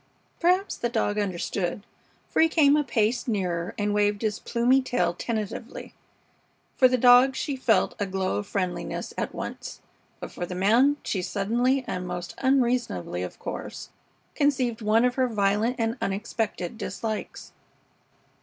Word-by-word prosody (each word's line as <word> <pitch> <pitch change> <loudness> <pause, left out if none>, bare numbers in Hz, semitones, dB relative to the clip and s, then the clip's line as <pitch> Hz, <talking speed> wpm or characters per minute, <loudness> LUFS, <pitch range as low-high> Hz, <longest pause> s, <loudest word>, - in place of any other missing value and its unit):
Perhaps 365 +3 +2
the 240 - -1
dog 215 -3 0
understood, 190 0 -2 0.4
for - - +1
he 325 - +5
came 295 -3 +5
a 300 - +2
pace 235 -1 0
nearer 180 -6 -2
and 205 0 0
waved 205 +1 +1
his 215 -1 -1
plumy 245 +3 +2
tail 180 -9 0
tentatively. 220 +4 -5 0.8
For 255 - +6
the 255 0 +1
dog 250 +2 +6
she 285 0 -2
felt 255 -4 +2
a 205 - -1
glow 190 0 -1
of 205 - -4
friendliness 185 -3 -3
at - - -3
once, - - -6 0.4
but - - -7
for 175 - -5
the 180 - -6
man 235 +10 +4
she 190 - -2
suddenly, 240 +8 0
and 180 0 -4
most 175 0 -5
unreasonably, 245 - 0
of 90 - -6
course, - - -7 0.4
conceived 260 -6 +1
one 220 +3 +3
of 250 - +2
her 255 0 +1
violent 210 +2 +1
and 230 +1 -1
unexpected 205 -1 -3
dislikes. 220 -2 -5
225 Hz, 150 wpm, -26 LUFS, 195-255 Hz, 0.8 s, For